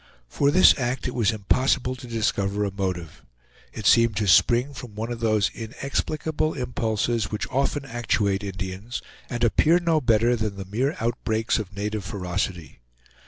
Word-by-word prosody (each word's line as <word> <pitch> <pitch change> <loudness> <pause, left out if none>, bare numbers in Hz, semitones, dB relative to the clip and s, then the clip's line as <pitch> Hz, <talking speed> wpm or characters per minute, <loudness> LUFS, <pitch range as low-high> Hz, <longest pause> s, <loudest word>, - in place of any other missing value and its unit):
For 140 - +1
this 185 +6 +7
act 125 0 -2
it 125 - -4
was 115 -4 +2
impossible 125 +4 +1
to 125 0 -10
discover 105 -3 0
a 100 - -2
motive. 95 -4 -4 0.5
It 110 - -8
seemed 115 -1 +5
to 105 0 0
spring 120 - +4
from 125 -5 -9
one 110 +2 -4
of 120 - -4
those 110 -3 +2
inexplicable 150 +6 -2
impulses 115 -4 -1
which 105 - -3
often 140 +2 0
actuate 105 -5 0
Indians 95 +4 -5 0.3
and 120 -1 -3
appear 155 +9 +4
no 165 -3 +1
better 120 0 +3
than 110 -3 -2
the 95 -1 -7
mere 125 +10 -1
outbreaks 115 -1 0
of 100 -2 -7
native 105 +1 -3
ferocity. 90 -6 -4
115 Hz, 160 wpm, -24 LUFS, 100-125 Hz, 0.5 s, this